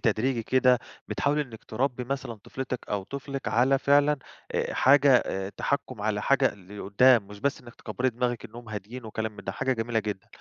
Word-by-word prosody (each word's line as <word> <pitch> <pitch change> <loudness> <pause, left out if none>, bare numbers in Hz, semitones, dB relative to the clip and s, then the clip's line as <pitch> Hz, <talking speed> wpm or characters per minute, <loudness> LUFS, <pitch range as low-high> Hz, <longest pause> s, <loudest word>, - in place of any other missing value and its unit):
تدريجي 120 +1 +1
كده 125 +1 +4 0.3
بتحاولي 145 +1 +1
إنك 115 -6 -12
تربّي 125 +2 -1
مثلًا 135 -2 -3
طفلتِك 125 +4 -5
أو 100 -1 -1
طفلِك 140 +4 -5
على 130 +4 +3
فعلًا 145 +2 +4 0.4
آآ - - -1
حاجة 140 0 +6
آآ 95 -5 -1
تحكّم 130 -5 -2
على 105 -1 0
حاجة 140 -1 +3
لقدّام 100 +4 +3
مش 100 0 -11
بس 140 +3 0
إنك 120 -1 -13
تكبّري 125 +4 -2
دماغِك 120 -1 -2
إنهم 120 +1 -10
هادين 110 +4 -7
وكلام 110 0 -3
من - - -10
ده، 95 - -3
حاجة 130 +6 0
جميلة 115 -1 -1
جدًا. 105 -3 -4
120 Hz, 180 wpm, -27 LUFS, 110-135 Hz, 0.4 s, حاجة